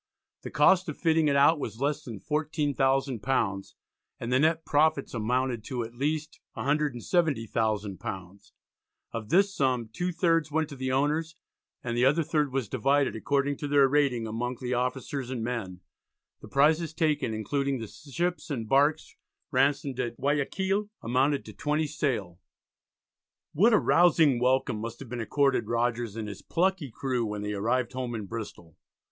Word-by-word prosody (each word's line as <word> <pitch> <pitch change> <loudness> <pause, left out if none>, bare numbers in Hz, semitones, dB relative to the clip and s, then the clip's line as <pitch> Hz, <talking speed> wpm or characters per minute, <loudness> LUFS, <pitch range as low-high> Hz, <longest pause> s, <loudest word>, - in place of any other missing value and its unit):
The - - -7
cost 185 -2 +4
of 150 - -5
fitting 160 -2 +2
it 140 - +2
out 145 +3 +5
was 115 - -5
less 145 +2 0
than 115 -5 -8
£14,000 135 - 0 0.5
and 120 +1 -3
the 130 - +4
net 160 +2 +2
profits 150 -1 +2
amounted 120 +1 -1
to 125 -3 -3
at 115 +1 -9
least 150 +4 -2 0.2
£170,000. 115 - -1 0.6
Of 110 -2 -6
this 195 +2 +3
sum, 125 -4 0
two 180 +6 -2
thirds 165 -3 +1
went 160 0 0
to 140 - -8
the 130 0 -3
owners, 150 +4 0 0.5
and 120 -1 -3
the 120 +1 +3
other 150 +5 +3
third 150 -3 0
was 130 -4 -1
divided, 135 +4 +1
according 140 +4 0
to 145 - -4
their 140 -1 +5
rating, 135 -5 +1
among 120 +3 -3
the 125 -1 -3
officers 125 +1 -2
and 125 -3 -3
men. 105 -7 -4 0.6
The - - -11
prizes 155 +3 +2
taken, 150 -8 0
including 140 +5 -1
the 115 - -5
ships 155 - -4
and 120 -7 -3
barks 145 +5 +2 0.4
ransomed 140 -2 +1
at 120 -2 -3
Guiaquil, 190 +9 0
amounted 135 +4 +1
to - - -10
twenty 150 +2 0
sail. 120 - -2 1.2
A 215 +7 +5
rousing 165 -9 +4
welcome 125 -3 +1
must 115 +1 -6
have 135 - -10
been 120 0 -4
accorded 140 +4 +1
Rogers 120 -2 -1
and 110 -2 -4
his 100 -2 -8
plucky 180 -4 0
crew 125 +1 -2
when 105 -2 -4
they 105 0 -3
arrived 120 +5 0
home 125 -2 -3
in 105 -2 -4
Bristol. 95 -6 -8
135 Hz, 155 wpm, -28 LUFS, 115-150 Hz, 1.2 s, out